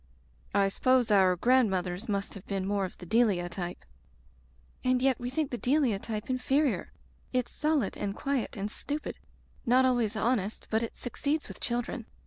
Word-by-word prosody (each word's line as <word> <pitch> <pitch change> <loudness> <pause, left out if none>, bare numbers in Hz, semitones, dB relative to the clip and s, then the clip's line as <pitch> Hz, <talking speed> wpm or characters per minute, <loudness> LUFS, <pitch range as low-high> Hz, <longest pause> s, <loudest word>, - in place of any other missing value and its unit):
"I 200 -1 +4
suppose 250 +2 +3
our 190 -3 +5
grandmothers 195 -3 +2
must 200 -1 -1
have 200 - -10
been 195 -2 -2
more 200 0 0
of 185 - -8
the 180 - -10
Delia 200 -3 +3
type. 175 -1 -5 1.0
"And 255 0 +3
yet 260 -1 +2
we 245 - -3
think 290 +2 -1
the 245 - -3
Delia 255 -6 +2
type 215 0 -4
inferior. 265 +2 +1 0.4
It's 250 -2 0
solid 300 -8 +1
and 200 -1 -3
quiet 275 -4 -2
and 200 +2 -3
stupid 295 +5 -4 0.3
— - - -30
^not 255 +2 +5
always 240 -4 +2
honest, 220 -2 0
but 220 0 +2
it 230 - -4
succeeds 285 +5 -2
with - - -10
children. 240 -1 -2
230 Hz, 170 wpm, -29 LUFS, 200-255 Hz, 1.0 s, our